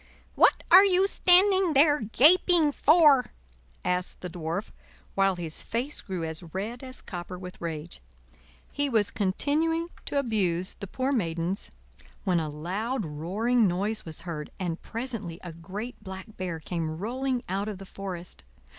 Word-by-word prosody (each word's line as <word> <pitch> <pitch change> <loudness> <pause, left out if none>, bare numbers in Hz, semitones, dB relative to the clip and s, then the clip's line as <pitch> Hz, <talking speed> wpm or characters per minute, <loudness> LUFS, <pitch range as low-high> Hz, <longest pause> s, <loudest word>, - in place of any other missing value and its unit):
"What - - +4
are 380 - +10
you 380 -1 +4
standing 375 -2 +4
there 295 +1 +5
gaping 310 - +4
for?" 295 -3 +5 0.5
asked 180 0 -1
the 180 - -5
Dwarf, 170 +4 -4 0.4
while 195 -1 +2
his 165 -3 -2
face 250 +6 -2
grew 185 -4 -4
as 160 0 -3
red 195 +8 -5
as 255 -1 -9
copper 180 0 -6
with 180 0 -10
rage; 165 - -5 0.7
he 285 0 -1
was 220 -5 +2
continuing 305 - 0 0.2
to - - -2
abuse 190 -9 0
the 200 - -8
poor 260 +7 -1
Maidens, 175 -5 -1 0.5
when 180 -4 +2
a 155 -2 -2
loud 195 - -3
roaring 200 +10 +1
noise 200 +5 -1
was 160 -2 -5
heard, 160 -4 -6
and 175 -3 -3
presently 225 -8 -4
a 175 - -6
great 200 +8 -7
black 190 +2 -9
Bear 180 -3 -4
came 160 -1 -3
rolling 250 +5 -2
out 195 +3 -2
of 210 -3 -4
the 195 - -10
forest. 180 - -6
195 Hz, 150 wpm, -27 LUFS, 175-260 Hz, 0.7 s, are